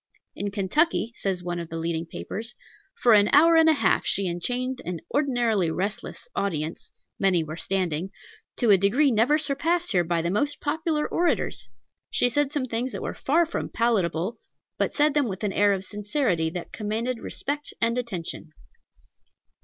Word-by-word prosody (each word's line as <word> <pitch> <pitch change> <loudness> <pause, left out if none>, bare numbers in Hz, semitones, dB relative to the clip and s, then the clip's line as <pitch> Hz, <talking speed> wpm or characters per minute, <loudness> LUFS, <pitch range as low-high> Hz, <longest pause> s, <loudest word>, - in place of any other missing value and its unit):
In 205 - -3
Kentucky, 225 - +1
says 185 -2 -2
one 175 0 -3
of 170 -1 -6
the 165 - -5
leading 165 0 -2
papers, 220 +7 -6 0.4
"For 240 - +4
an 205 -1 +6
hour 330 +3 +7
and 325 0 +6
a - - +6
half 225 -10 +2
she 195 - 0
enchained 245 +9 -2
an 175 -2 -5
ordinarily 240 - +1
restless 195 +6 -4
audience 160 -4 -2 0.3
many 185 -4 +3
were 155 0 -6
standing 180 -1 -1 0.5
to 235 -4 +3
a 195 - +6
degree 250 +9 +3
never 240 +7 +3
surpassed 315 +4 0
here 180 -4 +3
by 170 -1 -1
the 170 - 0
most 285 +9 0
popular 310 0 -1
orators. 305 - 0 0.4
She 245 - +3
said 290 +2 +1
some 290 -4 -1
things 245 +1 -2
that - - -5
were - - -3
far 330 +5 +2
from 330 - -4
palatable, 210 -3 0 0.4
but - - +1
said 300 -1 +2
them 290 -3 +2
with 190 0 -5
an 200 -2 0
air 205 0 +4
of 190 -1 -1
sincerity 205 - 0
that 175 +1 -7
commanded 225 +3 -2
respect 290 +4 -4
and 230 0 +2
attention." 180 -9 -5
215 Hz, 170 wpm, -25 LUFS, 180-280 Hz, 0.5 s, hour